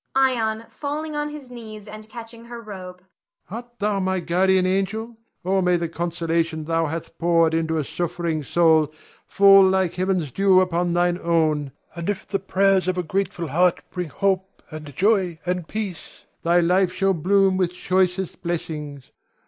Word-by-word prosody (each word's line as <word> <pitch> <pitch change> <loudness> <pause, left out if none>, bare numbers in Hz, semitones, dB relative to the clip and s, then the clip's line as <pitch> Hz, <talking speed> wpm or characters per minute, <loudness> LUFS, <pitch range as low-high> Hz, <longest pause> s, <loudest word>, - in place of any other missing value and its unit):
Ion 230 -4 +1
[falling 300 +1 -4
on 295 0 -2
his 290 -4 -10
knees 215 -3 -10
and 215 +1 -10
catching 230 +1 -10
her 235 0 -8
robe]. 185 -4 -9 0.5
Art 240 +2 -8
thou 205 -2 0
my 190 0 0
guardian 185 +2 +2
angel? 195 +5 -1 0.3
Oh, 190 +1 +2
may 180 -1 +3
the 170 0 -2
consolation 165 -1 -1
thou 165 +1 0
hath 165 +2 -6
poured 165 -1 +3
into 160 0 0
a 155 - 0
suffering 170 0 -2
soul, 160 0 +3 0.4
fall 195 0 +7
like 190 -2 +2
heaven's 180 -5 -1
dew 195 +4 +4
upon 175 -1 +1
thine 175 0 +1
own; 155 -4 +1 0.2
and 170 +2 -4
if 205 - -3
the 195 0 -1
prayers 195 0 +2
of 185 0 0
a 180 - 0
grateful 175 -1 -2
heart 175 +5 +2
bring 180 -3 -4
hope 190 +2 -1
and 150 -3 -9
joy 190 -3 +2
and 180 -2 -2
peace, 200 -7 -6 0.2
thy 170 +1 +3
life 180 +2 +2
shall 195 +1 +1
bloom 190 +3 +3
with 185 -2 +1
choicest 185 0 -1
blessings. 150 -5 -5
185 Hz, 165 wpm, -23 LUFS, 170-200 Hz, 0.5 s, fall